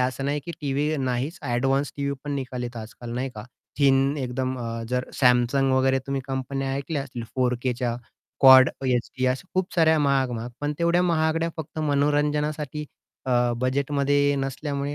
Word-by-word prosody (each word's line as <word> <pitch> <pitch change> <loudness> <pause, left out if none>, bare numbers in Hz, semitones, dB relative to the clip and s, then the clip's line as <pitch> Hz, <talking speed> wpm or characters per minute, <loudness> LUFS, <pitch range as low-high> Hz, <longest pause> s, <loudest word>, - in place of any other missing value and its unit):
असं 130 +1 -1
नाही, 145 +1 -1
की 170 - -4
टीव्ही 145 +2 0
नाहीच, 130 +5 -2 0.2
एडवान्स 135 +3 +1
टीव्ही 140 0 -1
पण 145 - -3
निघतात 125 -3 -4
आजकाल 120 +2 -10
नाही 130 +2 -2
का? 105 - -8 0.3
थिन 135 0 +3
एकदम 130 +1 -2
अ, 115 -1 -4
जर 125 +1 -1 0.2
Samsung 125 +2 +4
वगैरे 130 0 +3
तुम्ही 135 -1 -1
कंपन्या 135 0 -3
ऐकल्या 140 +1 -3
असतील, 125 -3 -7
4Kच्या 125 -1 0 0.4
कॉड 130 -1 +9 0.2
एचडी 130 +1 0
अशा 130 +8 -1
खूप 185 0 -1
साऱ्या 160 -2 +4
महाग 140 -3 +2
महाग, 120 0 -5
पण 145 0 -1
तेवढ्या 170 +1 +3
महागड्या 165 -1 +1
फक्त 160 0 -7
मनोरंजनासाठी 150 0 0 0.4
अ, 120 -1 +2
बजेटमध्ये 140 +2 +1
नसल्यामुळे 140 +1 -3
135 Hz, 155 wpm, -25 LUFS, 125-145 Hz, 0.4 s, कॉड